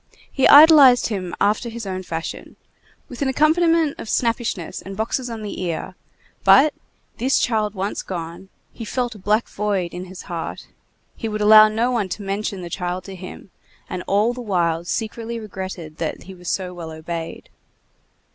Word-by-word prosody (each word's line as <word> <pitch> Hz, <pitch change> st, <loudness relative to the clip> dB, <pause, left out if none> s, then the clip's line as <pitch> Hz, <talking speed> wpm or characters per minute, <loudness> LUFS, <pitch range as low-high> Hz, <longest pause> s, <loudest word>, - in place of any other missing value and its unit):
He 270 Hz, -, +3 dB
idolized 285 Hz, -5 st, +8 dB
him 185 Hz, -5 st, -4 dB
after 210 Hz, +4 st, +1 dB
his 230 Hz, -1 st, -7 dB
own 185 Hz, -1 st, -4 dB
fashion, 165 Hz, -3 st, -6 dB, 0.5 s
with 250 Hz, -, -10 dB
an 280 Hz, -, +1 dB
accompaniment 315 Hz, +2 st, +2 dB
of 220 Hz, -, -7 dB
snappishness 230 Hz, -7 st, -1 dB
and 195 Hz, 0 st, -9 dB
boxes 235 Hz, +3 st, -2 dB
on 225 Hz, -2 st, -6 dB
the 205 Hz, -, -5 dB
ear; 175 Hz, +1 st, -3 dB, 0.5 s
but, 295 Hz, +3 st, +6 dB, 0.4 s
this 260 Hz, +3 st, +2 dB
child 215 Hz, -3 st, 0 dB
once 195 Hz, +2 st, -3 dB
gone, 170 Hz, +1 st, -7 dB, 0.2 s
he 230 Hz, -, -8 dB
felt 245 Hz, +1 st, -2 dB
a 210 Hz, -, -13 dB
black 210 Hz, +4 st, +1 dB
void 195 Hz, -4 st, -2 dB
in 180 Hz, +1 st, -6 dB
his 185 Hz, 0 st, -10 dB
heart; 170 Hz, -2 st, -6 dB, 0.5 s
he 225 Hz, -, -4 dB
would 215 Hz, 0 st, -3 dB
allow 215 Hz, +1 st, +8 dB
no 225 Hz, +3 st, 0 dB
one 220 Hz, -6 st, -1 dB
to 205 Hz, -, -5 dB
mention 195 Hz, -1 st, -3 dB
the -, -, -6 dB
child 180 Hz, 0 st, -3 dB
to 195 Hz, -, -9 dB
him, 185 Hz, +1 st, -10 dB, 0.4 s
and 185 Hz, -, -5 dB
all 210 Hz, +4 st, +2 dB
the 250 Hz, -, -7 dB
while 170 Hz, -6 st, 0 dB
secretly 225 Hz, +4 st, -4 dB
regretted 185 Hz, -7 st, -7 dB
that 160 Hz, -, -4 dB
he 190 Hz, -, -10 dB
was 180 Hz, -1 st, -8 dB
so 185 Hz, -2 st, -2 dB
well 170 Hz, -2 st, -7 dB
obeyed. 160 Hz, +1 st, -6 dB
205 Hz, 175 wpm, -21 LUFS, 180-235 Hz, 0.5 s, idolized